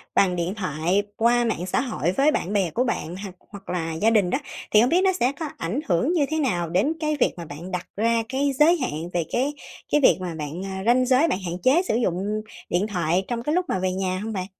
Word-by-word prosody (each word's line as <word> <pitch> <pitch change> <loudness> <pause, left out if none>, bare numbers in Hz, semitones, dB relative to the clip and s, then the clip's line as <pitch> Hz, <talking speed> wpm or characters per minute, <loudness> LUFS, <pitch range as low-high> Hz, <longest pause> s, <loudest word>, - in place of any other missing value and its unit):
bằng 185 -2 +3
điện 175 +3 -2
thoại 180 0 0 0.2
qua 240 +1 +3
mạng 220 -6 -1
xã 185 - 0
hội 215 - -1
với 280 +10 +3
bạn 195 - -2
bè 190 -5 +1
của 245 - +1
bạn, 180 -8 -3
hoặc 190 -3 -7 0.2
hoặc 200 -2 -11
là 165 -2 -2
gia 205 +8 +2
đình 210 -5 +3
đó, 220 - +1 0.3
thì 210 - +6
hông 245 - +3
biết 350 +5 +3
nó 380 -1 +3
sẽ 265 -7 +1
có 320 -2 -3
ảnh 180 +11 -2
hưởng 185 - +2
như 310 -5 +2
thế 315 0 -1
nào 175 - 0
đến 195 - +2
cái 305 -1 -1
việc - - +3
mà 170 - -6
bạn 160 +5 -8
đặt 180 -1 -4
ra 230 +2 +1
cái 280 +2 +1
giới 330 +4 +6
hạn 170 - -3
về 170 -2 0
cái 270 +4 0 0.4
cái 295 - +3
việc - - +6
mà 175 -3 -4
bạn 155 +4 -5
ơ, 190 0 -5
ranh 250 +2 +4
giới 260 +5 +4
bạn 190 - 0
hạn 170 0 -3
chế 280 +8 +5
sử - - +1
dụng 210 -1 -1 0.3
điện 185 +4 +1
thoại 180 -1 0
trong 235 -1 -3
cái 300 +4 0
lúc 365 0 +1
mà 190 - 0
về 185 0 0
nhà 185 0 -2
hông 220 0 -4
bạn? 185 -2 -3
205 Hz, 260 wpm, -24 LUFS, 180-255 Hz, 0.4 s, thì